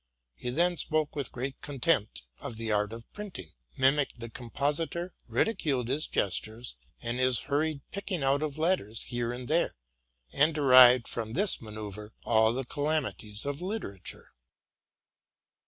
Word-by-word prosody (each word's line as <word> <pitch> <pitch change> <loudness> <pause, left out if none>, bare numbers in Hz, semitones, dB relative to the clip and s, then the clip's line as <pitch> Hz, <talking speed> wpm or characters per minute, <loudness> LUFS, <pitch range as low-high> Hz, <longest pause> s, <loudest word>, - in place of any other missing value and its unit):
He 65 - -5
then 175 +7 +1
spoke 155 -2 0
with 140 -4 -3
great 130 +2 -5
contempt 135 - 0 0.2
of 115 - -6
the 115 -1 -2
art 105 0 +1
of 115 0 -7
printing, 190 - -8 0.3
mimicked 135 0 +2
the 115 -1 -7
compositor, 150 +8 -1
ridiculed 140 - 0
his 145 +4 +1
gestures 110 +5 0 0.3
and 120 +2 -2
his 130 -2 +4
hurried 150 0 -1
picking 195 -5 -3
out 135 +2 +2
of 155 -2 -3
letters 155 - +1
here 120 -1 -2
and 125 0 -6
there, 165 +3 +1 0.6
and 150 +3 +3
derived 130 -4 +7
from 110 -1 -4
this 200 - +3
manceuyre 105 -1 -8
all 110 -1 +4
the 130 +2 -2
calamities 140 -7 -2
of 145 +2 -3
literature. 185 - -5
130 Hz, 140 wpm, -29 LUFS, 115-155 Hz, 0.6 s, derived